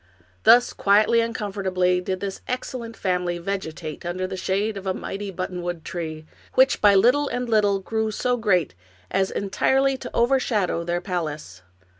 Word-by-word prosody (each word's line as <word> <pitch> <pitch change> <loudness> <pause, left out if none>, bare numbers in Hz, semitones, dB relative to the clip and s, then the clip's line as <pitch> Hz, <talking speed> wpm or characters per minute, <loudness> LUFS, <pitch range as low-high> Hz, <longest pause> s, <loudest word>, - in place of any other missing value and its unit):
Thus 245 +1 +6
quietly 215 +3 +4
and 230 0 -3
comfortably 185 -3 0
did 185 0 -3
this 195 -1 -4
excellent 245 -2 -5
family 180 -2 -1
vegetate 170 -4 -5
under 175 +2 -3
the 185 - -5
shade 200 +3 -1
of 195 -1 -7
a 185 - 0
mighty 200 0 -5
buttonwood 175 -2 -4
tree, 160 -3 -5 0.3
which 260 +1 +4
by 205 -1 +6
little 250 +9 +4
and 245 0 -3
little 210 -3 +3
grew 220 +3 -2
so 245 +3 0
great 195 - +1 0.4
as 190 0 +1
entirely 265 +7 +1
to - - -7
overshadow 235 -8 +1
their 175 +1 -2
palace. 155 - -4
195 Hz, 155 wpm, -24 LUFS, 180-225 Hz, 0.4 s, Thus